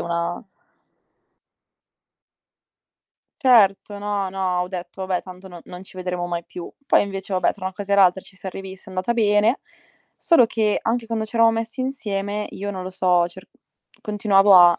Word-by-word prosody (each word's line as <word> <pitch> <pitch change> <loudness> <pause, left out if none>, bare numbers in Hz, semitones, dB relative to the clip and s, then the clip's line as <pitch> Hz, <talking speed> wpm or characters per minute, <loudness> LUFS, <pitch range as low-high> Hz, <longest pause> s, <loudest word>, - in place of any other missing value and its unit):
una 170 0 -2 3.0
Certo. 205 -6 +4
No, 205 -1 -2
no, 185 -2 -1
ho 180 - -5
detto: 185 +1 -6
"Vabbè, 185 -1 -1
tanto 185 +1 -12
no 175 -2 -11
non 180 0 -9
ci 190 - -12
vedremo 180 -1 -3
mai 170 -1 -3
più." 175 0 -8 0.2
Poi - - +5
invece, 195 -1 -4
vabbè, 185 -1 +2
tra 185 -2 -6
una 190 - -5
cosa 200 +1 -4
e 200 - +4
l'altra 190 -1 +5
ci - - -11
siam 195 -1 -7
rivisti, 190 -1 -8
è - - -11
andata 185 +5 -1
bene, 215 +1 +3 0.6
solo 330 -9 +5
che 220 -2 +1
anche 230 +1 -1
quando 225 -1 -2
ci 225 - -6
eravamo 230 0 +5
messi 225 +3 -3
insieme 210 -6 -3
io, 200 +1 -5
non 190 -2 -5
lo 185 - -5
so, 180 -2 +2
cer 185 +2 -11 0.5
continuavo 205 -1 +4
a 175 -1 +7
195 Hz, 175 wpm, -22 LUFS, 185-210 Hz, 3.0 s, a